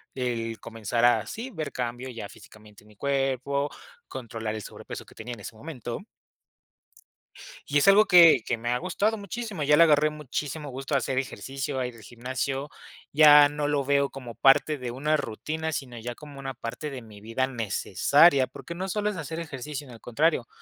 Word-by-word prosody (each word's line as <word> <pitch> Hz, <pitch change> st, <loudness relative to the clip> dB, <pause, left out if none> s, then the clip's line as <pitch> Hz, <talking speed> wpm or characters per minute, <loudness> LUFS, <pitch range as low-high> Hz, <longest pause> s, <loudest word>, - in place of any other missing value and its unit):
El 115 Hz, -3 st, -2 dB
comenzar 115 Hz, +1 st, -3 dB
a 115 Hz, -3 st, +4 dB
sí, 240 Hz, -, -6 dB
ver 155 Hz, -, -5 dB
cambio 125 Hz, +1 st, -4 dB
ya 115 Hz, -5 st, -7 dB
físicamente, 105 Hz, -1 st, -16 dB
en -, -, -20 dB
mi 105 Hz, -, -19 dB
cuerpo, 140 Hz, +2 st, -1 dB, 0.4 s
controlar 115 Hz, -4 st, -5 dB
el 110 Hz, -, -5 dB
sobrepeso -, -, -9 dB
que -, -, -17 dB
tenía, 120 Hz, +3 st, -7 dB
en 115 Hz, -, -10 dB
ese 110 Hz, -, -8 dB
momento. 125 Hz, -, -7 dB, 1.6 s
Y 145 Hz, -, +2 dB
es 145 Hz, -, +3 dB
algo 205 Hz, +2 st, +7 dB
que 170 Hz, -7 st, +8 dB
que 120 Hz, -, -1 dB
me 120 Hz, +1 st, -4 dB
ha 125 Hz, -, +2 dB
gustado 200 Hz, -, 0 dB
muchísimo, 205 Hz, -3 st, -5 dB
ya 150 Hz, +1 st, +5 dB
le 170 Hz, -, +8 dB
agarré 155 Hz, -1 st, +4 dB
muchísimo 150 Hz, 0 st, -5 dB
gusto 135 Hz, +2 st, -3 dB
a -, -, +6 dB
hacer 130 Hz, +1 st, -3 dB
ejercicio, 135 Hz, +1 st, -3 dB
a 125 Hz, -, -1 dB
ir 125 Hz, -, -9 dB
al 115 Hz, -, -14 dB
gimnasio. 130 Hz, +5 st, -4 dB, 0.4 s
Ya 150 Hz, -1 st, +8 dB
no 145 Hz, 0 st, -2 dB
lo 145 Hz, -1 st, +1 dB
veo 140 Hz, 0 st, +2 dB
como 125 Hz, -4 st, -9 dB
parte 140 Hz, +5 st, +4 dB
de 125 Hz, -3 st, -5 dB
una 150 Hz, +5 st, +1 dB
rutina, 155 Hz, +5 st, -4 dB
sino 130 Hz, -5 st, -5 dB
ya 120 Hz, +2 st, -6 dB
como 145 Hz, -1 st, -12 dB
una 135 Hz, -1 st, -5 dB
parte 125 Hz, +4 st, -6 dB
de 135 Hz, -3 st, -7 dB
mi 105 Hz, -3 st, -14 dB
vida, 115 Hz, +5 st, -1 dB
necesaria, 130 Hz, -, +3 dB
porque 170 Hz, -, -9 dB
no 185 Hz, +2 st, -3 dB
solo 210 Hz, +2 st, 0 dB
es 205 Hz, -, -5 dB
hacer 160 Hz, 0 st, -5 dB
ejercicio, 150 Hz, -3 st, -7 dB
sino 125 Hz, -, -11 dB
al 115 Hz, -, -14 dB
contrario, 130 Hz, 0 st, +1 dB
135 Hz, 195 wpm, -27 LUFS, 120-150 Hz, 1.6 s, que